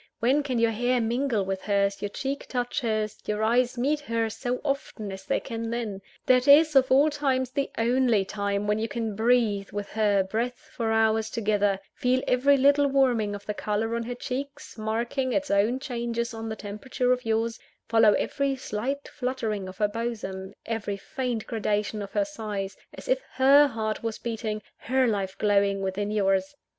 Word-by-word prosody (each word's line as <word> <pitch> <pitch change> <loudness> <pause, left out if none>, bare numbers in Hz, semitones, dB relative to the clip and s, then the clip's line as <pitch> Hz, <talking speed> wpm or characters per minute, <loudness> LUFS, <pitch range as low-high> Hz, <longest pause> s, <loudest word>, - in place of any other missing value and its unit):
when 260 +6 +3
can 265 -4 -2
your 230 0 +3
hair 245 +3 +1
mingle 235 -2 0
with 190 0 -3
hers, 200 -1 0
your 205 - -2
cheek 275 +6 -4
touch 245 0 -2
hers, 215 -3 -1
your 210 0 -1
eyes 245 +3 +2
meet 285 +5 +1
hers, 230 -6 -2
so 250 -1 -2
often 275 -7 -3
as 190 0 -8
they - - +1
can 230 -2 -5
then? 225 -4 -3 0.2
That 255 +1 +4
is, 305 +2 +7
of 260 -1 +5
all 285 +4 +5
times, 265 -3 0
the 275 0 -1
only 235 -3 +2
time 200 0 -2
when 210 +1 +1
you 225 - -1
can 225 -3 -3
breathe 220 -3 +2
with 205 0 -5
her 205 -3 +2
breath 235 +6 -4
for 225 -2 -1
hours 220 0 +2
together; 205 -3 +1
feel 255 +1 +1
every 275 +3 +4
little 285 +1 +4
warming 245 -7 +2
of 205 0 -10
the 210 - -2
colour 215 +2 -1
on 235 - -1
her 245 +1 -4
cheek 260 +3 -3 0.3
marking 235 +4 -1
its 290 0 0
own 205 +5 +3
changes 235 -3 -3
on 225 0 -5
the 220 - -3
temperature 220 +5 -1
of 250 0 -3
yours; 225 +1 0 0.3
follow 225 -2 +5
every 280 -1 0
slight 260 +3 -3
fluttering 230 -7 -3
of 185 0 -9
her 210 - +2
bosom, 205 -4 -5
every 220 -3 -3
faint 245 +1 -3
gradation 210 -1 -1
of 200 - -7
her 205 -1 +2
sighs, 200 -2 -5 0.2
as - - -10
if - - +2
her 275 +3 +6
heart 220 -4 -3
was 225 -1 -3
beating, 220 -2 -4
her 260 +1 +1
life 195 -4 -1
glowing, 200 -1 +2
within 195 +2 -2
yours. 195 +1 +1
225 Hz, 185 wpm, -26 LUFS, 210-255 Hz, 0.3 s, is